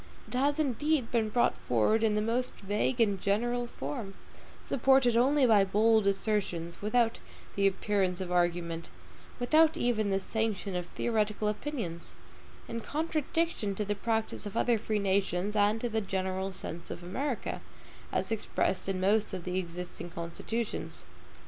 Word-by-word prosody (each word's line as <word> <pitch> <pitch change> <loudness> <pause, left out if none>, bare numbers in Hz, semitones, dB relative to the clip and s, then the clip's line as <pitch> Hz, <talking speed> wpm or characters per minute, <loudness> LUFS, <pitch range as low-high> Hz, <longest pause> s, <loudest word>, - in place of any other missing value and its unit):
It - - -11
has 280 +4 +2
indeed 295 -2 +1
been 225 -3 +1
brought 240 +3 +2
forward 125 - +2
in 220 -2 +2
the 210 - +1
most 240 +3 0
vague 210 +5 -1
and 205 -4 +2
general 240 +4 +1
form, 230 -6 -5 0.5
supported 265 -2 +4
only 265 +3 +4
by 215 -4 +6
bold 215 +2 +3
assertions, 195 -4 -1
without 225 +2 +2 0.4
the 200 0 +4
appearance 190 -1 0
of 185 -1 -4
argument; 175 -1 0 0.5
without 310 +6 +4
even 220 -4 +1
the 195 0 +2
sanction 205 -2 -2
of 175 -1 -2
theoretical 215 0 0
opinions; 210 - -4 0.5
in 230 0 -4
contradiction 310 - -1
to 210 - -2
the 205 - 0
practice 220 0 -2
of 200 - -5
other 235 -2 +3
free 215 0 -1
nations, 195 0 0
and 210 +1 +3
to 245 - 0
the 220 -1 -1
general 190 -1 -2
sense 170 -2 -7
of 175 - -7
America, 250 +8 -3 0.5
as - - -1
expressed 205 -3 -1
in 190 -1 -1
most 205 +2 +2
of 180 - -6
the 180 +1 -1
existing 175 -1 -6
constitutions. 170 +7 -4
210 Hz, 150 wpm, -30 LUFS, 190-235 Hz, 0.5 s, by